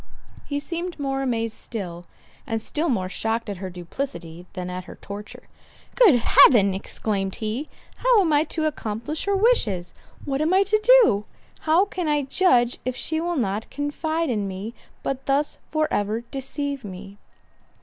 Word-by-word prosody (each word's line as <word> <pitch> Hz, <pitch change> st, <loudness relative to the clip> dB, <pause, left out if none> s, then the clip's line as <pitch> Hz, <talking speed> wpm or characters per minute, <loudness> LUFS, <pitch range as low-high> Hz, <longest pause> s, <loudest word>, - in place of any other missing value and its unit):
He 285 Hz, -1 st, -2 dB
seemed 340 Hz, +3 st, -4 dB
more 270 Hz, -1 st, -1 dB
amazed 230 Hz, -4 st, -1 dB
still—and 190 Hz, +2 st, -7 dB
still 305 Hz, +9 st, -2 dB
more 190 Hz, -8 st, 0 dB
shocked 225 Hz, +3 st, -2 dB
at 200 Hz, -, -5 dB
her 190 Hz, +1 st, -5 dB
duplicity 175 Hz, -2 st, -6 dB
than 180 Hz, -2 st, -5 dB
at 180 Hz, 0 st, -5 dB
her -, -, -10 dB
torture. 205 Hz, +1 st, -9 dB, 0.5 s
"Good 435 Hz, -, +6 dB
Heaven!" 215 Hz, -4 st, +6 dB
exclaimed 195 Hz, 0 st, -3 dB
he, 230 Hz, +7 st, -3 dB, 0.3 s
"How -, -, +4 dB
am 325 Hz, -5 st, +2 dB
I 295 Hz, +2 st, +4 dB
to 315 Hz, -1 st, -2 dB
accomplish 240 Hz, 0 st, -3 dB
her 400 Hz, 0 st, +2 dB
wishes? 235 Hz, -, +2 dB, 0.3 s
What 275 Hz, 0 st, -1 dB
am 325 Hz, +4 st, +2 dB
I 390 Hz, -, +6 dB
to 415 Hz, +2 st, +2 dB, 0.2 s
do? 205 Hz, -, +2 dB, 0.4 s
How 345 Hz, +5 st, +5 dB
can 360 Hz, -4 st, -4 dB
I 295 Hz, -1 st, +2 dB
judge, 260 Hz, -5 st, +3 dB
if 255 Hz, -1 st, -2 dB
she 315 Hz, +4 st, -1 dB
will 345 Hz, 0 st, -1 dB
not 210 Hz, -3 st, -1 dB
confide 315 Hz, +2 st, -1 dB
in 210 Hz, -4 st, -1 dB
me, 195 Hz, +4 st, -5 dB, 0.3 s
but 270 Hz, 0 st, -3 dB
thus 280 Hz, +2 st, +1 dB
for 310 Hz, -1 st, +1 dB
ever 210 Hz, +3 st, 0 dB
deceive 275 Hz, +2 st, -4 dB
me?" 195 Hz, 0 st, -9 dB
250 Hz, 160 wpm, -24 LUFS, 200-310 Hz, 0.5 s, Good